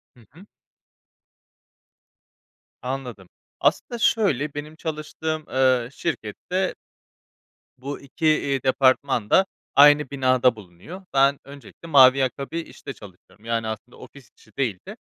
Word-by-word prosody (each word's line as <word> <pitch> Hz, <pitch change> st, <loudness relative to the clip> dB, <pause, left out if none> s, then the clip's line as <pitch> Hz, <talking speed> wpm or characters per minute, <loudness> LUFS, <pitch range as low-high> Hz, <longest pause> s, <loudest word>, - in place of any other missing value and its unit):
Hı 120 Hz, -, -20 dB
hı. 175 Hz, +7 st, -16 dB, 2.4 s
Anladım. 125 Hz, -7 st, -6 dB, 0.3 s
Aslında 240 Hz, -1 st, 0 dB
şöyle 150 Hz, -, +1 dB
benim 150 Hz, +2 st, -7 dB
çalıştığım, 155 Hz, 0 st, -5 dB
eee, 130 Hz, -2 st, +2 dB
şirkette 170 Hz, -, -3 dB, 1.0 s
bu 140 Hz, +2 st, -6 dB
2, 140 Hz, +4 st, -6 dB
eee, 140 Hz, -4 st, +1 dB
departman 130 Hz, -3 st, +2 dB
da 190 Hz, -, +5 dB, 0.3 s
aynı 145 Hz, 0 st, +6 dB
binada 130 Hz, -2 st, +2 dB
bulunuyor. 105 Hz, -, -12 dB
Ben 135 Hz, +1 st, +3 dB
öncelikle 140 Hz, +3 st, -13 dB
mavi 135 Hz, -3 st, +7 dB
yaka 135 Hz, +1 st, -2 dB
bir 165 Hz, 0 st, -4 dB
işte 135 Hz, -, -10 dB
çalışıyorum. 105 Hz, +2 st, -17 dB
Yani 115 Hz, -1 st, -2 dB
aslında 110 Hz, +3 st, -7 dB
ofis 130 Hz, 0 st, -15 dB
işi 110 Hz, -, -22 dB
değil 115 Hz, -9 st, -1 dB
de, -, -, -9 dB
135 Hz, 120 wpm, -23 LUFS, 125-150 Hz, 2.4 s, mavi